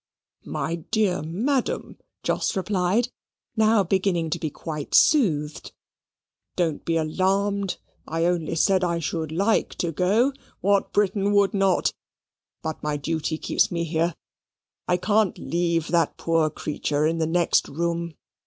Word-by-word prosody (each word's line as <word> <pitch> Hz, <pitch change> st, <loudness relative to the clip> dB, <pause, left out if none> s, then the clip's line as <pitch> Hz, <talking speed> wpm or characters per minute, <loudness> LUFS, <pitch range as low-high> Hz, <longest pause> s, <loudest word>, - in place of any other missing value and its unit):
"My 165 Hz, +2 st, -2 dB
dear 185 Hz, +2 st, 0 dB
madam," 230 Hz, -, -2 dB, 0.2 s
Jos -, -, 0 dB
replied, 195 Hz, +4 st, +1 dB, 0.5 s
now 220 Hz, -2 st, +4 dB
beginning 180 Hz, -3 st, 0 dB
to 170 Hz, -, -1 dB
be 155 Hz, -, -2 dB
quite 150 Hz, -1 st, -5 dB
soothed, 155 Hz, -, +3 dB, 0.8 s
"don't 165 Hz, -4 st, -1 dB
be 165 Hz, 0 st, +1 dB
alarmed. 195 Hz, +4 st, 0 dB, 0.3 s
I 165 Hz, +1 st, 0 dB
only 170 Hz, -2 st, 0 dB
said 185 Hz, +3 st, +3 dB
I 170 Hz, -1 st, +1 dB
should 160 Hz, -1 st, -3 dB
like 200 Hz, +7 st, +1 dB
to 170 Hz, -, -1 dB
go 205 Hz, -, +2 dB, 0.3 s
what 200 Hz, +1 st, +2 dB
Briton 200 Hz, 0 st, +1 dB
would 200 Hz, -1 st, +3 dB
not? 195 Hz, -2 st, +2 dB, 0.7 s
But 160 Hz, -1 st, -4 dB
my 150 Hz, -1 st, -1 dB
duty 160 Hz, +1 st, -2 dB
keeps -, -, +1 dB
me 170 Hz, -1 st, -1 dB
here: 165 Hz, +1 st, 0 dB, 0.7 s
I 180 Hz, -, +2 dB
can't 205 Hz, +1 st, +1 dB
leave 170 Hz, -1 st, -1 dB
that 170 Hz, -3 st, +1 dB
poor 165 Hz, -2 st, +1 dB
creature 150 Hz, 0 st, -2 dB
in 165 Hz, +1 st, 0 dB
the 160 Hz, -, +1 dB
next 170 Hz, +1 st, +2 dB
room." 170 Hz, +1 st, -2 dB
170 Hz, 135 wpm, -24 LUFS, 160-195 Hz, 0.8 s, now